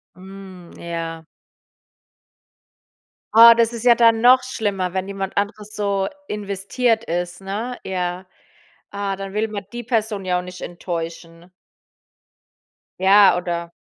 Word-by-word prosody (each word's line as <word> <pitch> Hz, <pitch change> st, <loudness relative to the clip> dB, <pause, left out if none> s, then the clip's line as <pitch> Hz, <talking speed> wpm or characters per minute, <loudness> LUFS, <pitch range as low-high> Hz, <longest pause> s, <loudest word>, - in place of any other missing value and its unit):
Hm. 185 Hz, -1 st, -12 dB
Ja. 165 Hz, -1 st, -6 dB, 2.1 s
Oh, 230 Hz, +1 st, +10 dB
das 230 Hz, 0 st, +2 dB
ist 230 Hz, -1 st, -6 dB
ja 240 Hz, -, +8 dB
dann 230 Hz, -1 st, +4 dB
noch 255 Hz, +2 st, +6 dB
schlimmer, 200 Hz, -7 st, -3 dB
wenn 190 Hz, 0 st, -2 dB
jemand 195 Hz, -1 st, -5 dB
anderes 205 Hz, +1 st, -3 dB
so 200 Hz, -2 st, -1 dB, 0.2 s
investiert 210 Hz, +3 st, -1 dB
ist, 175 Hz, +1 st, -4 dB
ne? 215 Hz, +6 st, -5 dB
Ja. 180 Hz, -1 st, -3 dB, 0.6 s
Ah, 200 Hz, -1 st, -3 dB
dann 195 Hz, 0 st, -7 dB
will 215 Hz, +2 st, 0 dB
man 205 Hz, -2 st, -6 dB
die 240 Hz, 0 st, -6 dB
Person 220 Hz, -4 st, -2 dB
ja 180 Hz, -1 st, +1 dB
auch -, -, -4 dB
nicht 180 Hz, 0 st, -10 dB
enttäuschen. 170 Hz, 0 st, -7 dB, 1.5 s
Ja, 195 Hz, 0 st, +6 dB
oder? 170 Hz, -1 st, -4 dB
195 Hz, 125 wpm, -21 LUFS, 180-220 Hz, 2.1 s, Oh